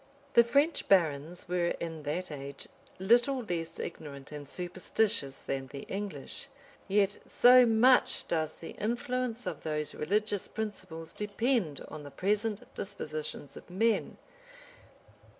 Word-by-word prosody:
The 235 - +8
French 285 +7 +2
barons 165 -2 +2
were 175 -1 +1
in 165 -2 -4
that 155 +4 -3
age 140 -1 -7 0.3
little 240 +7 +3
less 165 -5 -3
ignorant 145 -4 -7
and 145 -2 -8
superstitious 180 -4 -1
than 135 -1 -2
the 140 +1 -7
English: 195 - -5 0.4
yet, 200 0 +2
so 250 0 +7
much 240 +3 +4
does 160 -2 0
the 165 - -8
influence 240 +2 -1
of 175 -5 -4
those 150 -1 -2
religious 205 +4 0
principles 185 -7 -6
depend 210 - 0
on 155 - -8
the 145 - -8
present 210 - 0
dispositions 155 -6 -5
of - - -12
men! 220 +5 +1
185 Hz, 125 wpm, -31 LUFS, 155-220 Hz, 0.4 s, The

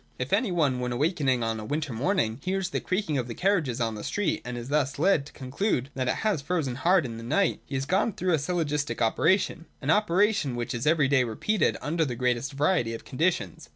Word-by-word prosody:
If - - -3
any 235 -7 +2
one, 145 -7 +1
when 125 0 -2
awaking 135 -2 +1
on 115 -1 -1
a - - -6
winter 145 +2 -3
morning, 115 - 0
hears 190 0 -1
the - - -1
creaking 185 -7 -1
of 125 - -3
the 115 - -6
carriages 170 - +1
on 115 -2 0
the 105 - -7
street, 205 -1 -1
and 125 0 -5
is 120 +2 -6
thus 140 -2 0
led 155 -3 +2
to - - -13
conclude 135 - -2
that 130 -1 -2
it - - +1
has 205 -9 +1
frozen 150 -4 -1
hard 170 +6 +3
in 115 -2 -6
the 115 - -8
night, 195 +12 +1
he 140 - -5
has 135 0 -1
gone 190 +7 +1
through 185 -3 0
a 160 - +3
syllogistic 150 -5 -1
operation: 170 - +1
— - - -39
an 145 +2 0
operation 200 - +2
which 120 +2 -3
is 120 +3 -3
every 155 -3 +4
day 135 -2 +3
repeated 125 - 0
under 160 +2 0
the 130 -5 -2
greatest 125 +3 -1
variety 140 -5 +1
of - - -10
conditions. 130 - -1
145 Hz, 230 wpm, -27 LUFS, 125-180 Hz, -, every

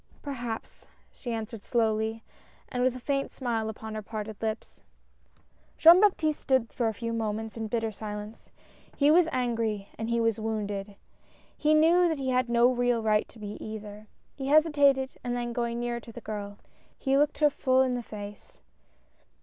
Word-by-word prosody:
"Perhaps!" 240 -5 -6 0.2
she 245 - -7
answered 225 -1 -5
slowly 220 -1 0 0.5
and 250 - -2
with 255 0 +2
a - - -6
faint 275 +2 -1
smile 230 -4 -2
upon 220 0 -7
her 215 - -4
parted 215 0 -6
lips. 220 0 -4 1.0
Jean 340 +3 +8
Baptiste 320 -7 +2
stood 260 -4 +1
for 235 - 0
a 220 - 0
few 230 +2 -3
moments 220 -1 -3
in 225 -1 -4
bitter 225 0 -1
silence. 210 +1 -8 0.5
He 290 +1 +5
was 335 0 +5
angry 225 -5 -1
and 225 +1 -3
he 235 0 +1
was 225 -1 +1
wounded. 205 -2 -3 0.6
He 305 +1 +3
knew 340 +3 +5
that 320 - -1
he 265 -1 -2
had 255 -1 +1
no 235 +1 +5
real 245 -2 +1
right 215 -1 +2
to - - -17
be 210 -1 -7
either. 215 -1 -8 0.3
He 270 -1 -5
hesi 310 +3 +5
tated 275 -2 +3
and 245 0 -2
then 240 -1 -3
going 235 0 -2
nearer 240 0 -2
to 235 - -12
the 240 - -9
girl, 205 -2 -6 0.4
he 270 -1 +1
looked 295 +1 +2
her 300 -1 +4
full 260 -2 +3
in 255 -1 0
the 245 - -2
face. 205 -2 -10
235 Hz, 180 wpm, -28 LUFS, 220-265 Hz, 1.0 s, Jean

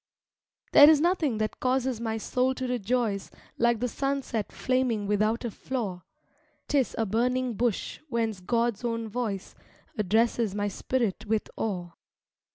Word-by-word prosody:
There 290 +1 +9
is 310 -2 +6
nothing 320 - +1
that 215 0 -2
causes 255 -2 0
my 225 -1 -1
soul 255 +4 0
to 260 - -3
rejoice 235 -3 -1 0.3
Like 235 -1 +3
the 250 - 0
sunset 275 -4 -2
flaming 255 -5 0
without 215 +4 +1
a 235 - -2
flaw: 205 -7 -4 0.7
'Tis 275 -4 +1
a 225 - +1
burning 245 +4 0
bush 230 -1 -1
whence 225 -4 -1
God's 235 +4 0
own 230 -1 -2
voice 210 -4 -3 0.5
Addresses 220 +1 +2
my 205 0 0
spirit 220 0 -2
with 220 0 -1
awe. 180 -5 -3
230 Hz, 140 wpm, -28 LUFS, 215-255 Hz, 0.7 s, There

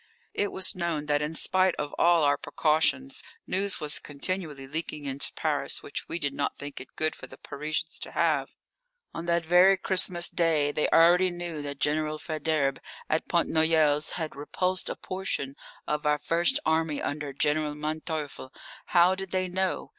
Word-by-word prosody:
It 205 - -1
was 190 +1 +2
known 170 -5 -2
that 145 0 +1
in 150 +2 -3
spite 185 +2 +2
of 145 -1 -4
all 170 -1 +5
our 145 0 +4
precautions 160 - +1 0.2
news 195 +1 0
was 150 -1 -3
continually 150 -1 -4
leaking 150 +1 -5
into 135 0 -2
Paris - - -1
which - - -4
we - - -1
did 145 -4 -2
not 145 - -2
think 145 -1 -7
it 130 - -14
good 155 0 0
for - - -10
the - - -13
Parisians 155 +2 -4
to - - -7
have. - - +1 0.6
On 165 +1 -6
that 170 -1 +1
very 180 +3 +6
Christmas 180 -2 +1
Day 155 -4 +2
they 150 +1 +1
already 175 +3 +6
knew 175 -3 -5
that 140 -1 -5
General 155 +1 0
Faidherbe, 155 -3 -1 0.3
at 155 - 0
Pont 170 -1 +2
Noyelles, 160 -2 +3
had 160 -3 -4
repulsed 180 +6 -1
a - - -3
portion 185 -7 -4 0.3
of 150 0 -1
our 150 0 +3
first 175 - +2
army 160 -2 +1
under 145 -1 -3
General 150 +2 0
Manteuffel. 155 -2 -4 0.4
How 175 +1 +5
did 190 0 -5
they 185 0 0
know? 185 +1 -1
160 Hz, 170 wpm, -28 LUFS, 150-175 Hz, 0.6 s, very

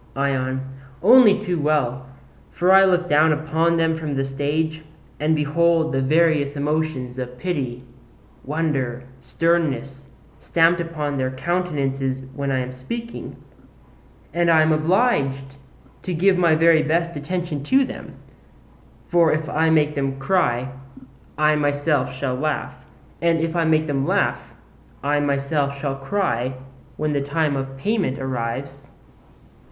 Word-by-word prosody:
ION: 130 -1 -1 0.4
Only 225 -1 +7
too 180 -5 -3
well; 130 -4 0 0.4
for 180 +2 +1
I 195 0 +7
look 180 -1 +2
down 155 +1 +4
upon 160 +2 +1
them 165 0 +1
from 155 -3 -4
the 135 0 0
stage, 150 +4 -2 0.4
and 155 +2 +2
behold 160 +2 +2
the 135 - +1
various 150 0 +2
emotions 145 -4 -2
of 125 0 -6
pity, 130 -8 -3 0.6
wonder, 135 -5 -2 0.2
sternness, 140 -2 -1 0.3
stamped 170 +1 +2
upon 150 -4 -3
their 130 0 0
countenances 135 -3 -2
when 140 -1 -3
I 130 -1 0
am 125 0 -5
speaking: 230 - -7 1.0
and 170 0 +2
I 160 -1 +5
am 155 - +2
obliged 155 - +1 0.4
to 180 - -4
give 185 +4 +3
my 170 -3 +3
very 165 0 +5
best 170 +2 0
attention 155 0 -3
to 265 - +3
them; 260 - -9 0.9
for 170 -2 +3
if 155 0 -1
I 160 +1 +1
make 150 -2 +3
them 135 -2 -2
cry 135 -5 0 0.7
I 155 0 +3
myself 145 -2 0
shall 130 0 -3
laugh, 145 +1 -2 0.5
and 170 -1 +2
if 165 +1 -2
I 170 -1 +1
make 155 0 +2
them 140 -2 -1
laugh - - -1 0.5
I 145 +1 +1
myself 140 0 -1
shall 140 -1 -2
cry 135 - -2 0.4
when 155 0 -1
the 140 - 0
time 145 +1 0
of 135 0 -5
payment 190 - -1
arrives. 135 +2 -5
150 Hz, 135 wpm, -22 LUFS, 135-165 Hz, 1.0 s, Only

